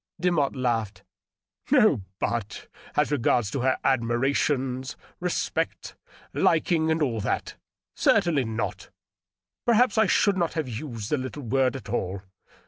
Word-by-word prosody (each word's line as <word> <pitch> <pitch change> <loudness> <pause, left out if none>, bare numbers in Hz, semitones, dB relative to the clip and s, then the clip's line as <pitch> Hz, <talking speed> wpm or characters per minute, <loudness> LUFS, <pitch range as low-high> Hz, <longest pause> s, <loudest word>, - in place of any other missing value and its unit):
Demotte 170 -6 +1
laughed. 115 -5 -1 0.3
" - - -29
No - - +5
^ - - -8 0.2
but' 115 -3 -3 0.3
as 150 0 +2
r^ards 120 -3 +1
her 130 +1 +2
admiration, 130 +1 +1 0.4
respect, - - -2 0.4
liking, 160 -1 +2
and 160 0 +2
all 120 -6 -1
that 105 - -2 0.4
Certainly 170 - +3
not. 110 0 -4 0.7
Perhaps 235 -1 +3
I 220 - +4
should 200 -2 +3
not 170 -2 0
have 160 -4 -2
used 115 -3 -6
the 150 - +2
little 130 +3 -6
word 130 +2 +1
at 130 -6 -8
all. 95 -4 -2
130 Hz, 135 wpm, -26 LUFS, 115-160 Hz, 0.7 s, No